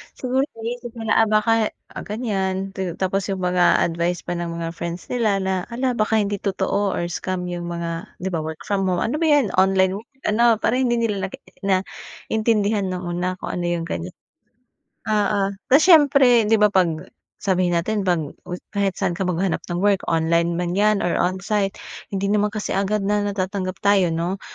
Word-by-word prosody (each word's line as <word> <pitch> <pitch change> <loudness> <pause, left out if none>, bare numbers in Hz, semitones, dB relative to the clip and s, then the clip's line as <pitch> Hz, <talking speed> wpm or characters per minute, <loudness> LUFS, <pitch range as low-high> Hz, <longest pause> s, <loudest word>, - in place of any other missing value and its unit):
siguro 255 +1 -1 0.2
naisip 235 +1 -6
nila, 225 -1 -3
ah, 225 - +4
baka, 215 +1 +3 0.2
ah, - - -7
ganyan. 195 -4 -2
Ta 190 -3 -4
tapos 190 +1 -1
’yong 190 -2 -3
mga 180 0 +3
advice 170 +1 -1
pa 175 -1 -3
ng 175 - -3
mga 165 0 -4
friends 170 +1 -6
nila 225 -5 +1
na, 190 -1 -1
hala, 250 +2 -1
baka 220 -2 0
hindi 205 -2 0
totoo 200 0 -1
or 175 0 -2
scam 185 +1 -3
’yong 175 0 -4
mga, 170 -1 -4 0.2
’di 190 - -2
ba, 165 - -1
work 155 0 -6
from 195 -2 0
home, 180 -1 +1
ano 270 +7 -1
ba 330 - +2
’yan, 290 -9 +3
online 190 0 +3
work 225 - -16 0.2
ano? 235 +1 +4
Para 230 +3 0
hindi 245 -2 +2
nila 210 -5 -1
nage - - -12 0.2
naintindihan 205 +2 -1
no'ng 185 0 -4 0.2
una, 185 +1 -1
kung - - -6
ano 175 -1 -3
’yong 170 -1 -1
ganyan. 170 +1 -5 0.9
Oo, 205 -2 +1 0.2
tas 280 +4 +6
siyempre, 275 - +6
’di 225 - +5
ba, 210 -1 +3
’pag 175 -2 0 0.2
sabihin 180 -2 +1
natin, 195 +3 -1
’pag 165 -4 +2 0.5
kahit 200 -3 0
sa'n - - 0
ka 185 +1 -2
maghanap 180 +1 0
ng 175 +3 -2
work, 200 -2 +3
online 170 +1 +1
man 175 0 -2
’yan 210 +2 +2
or 175 - +1
on-site, 195 +2 0 0.3
hindi 200 0 -1
naman 210 0 +2
kasi 210 0 -4
agad 200 +1 0
na 205 +1 +1
natatanggap 195 -2 -2
tayo, 200 -3 +4
’no? 170 +4 -2
195 Hz, 185 wpm, -22 LUFS, 180-215 Hz, 0.9 s, tas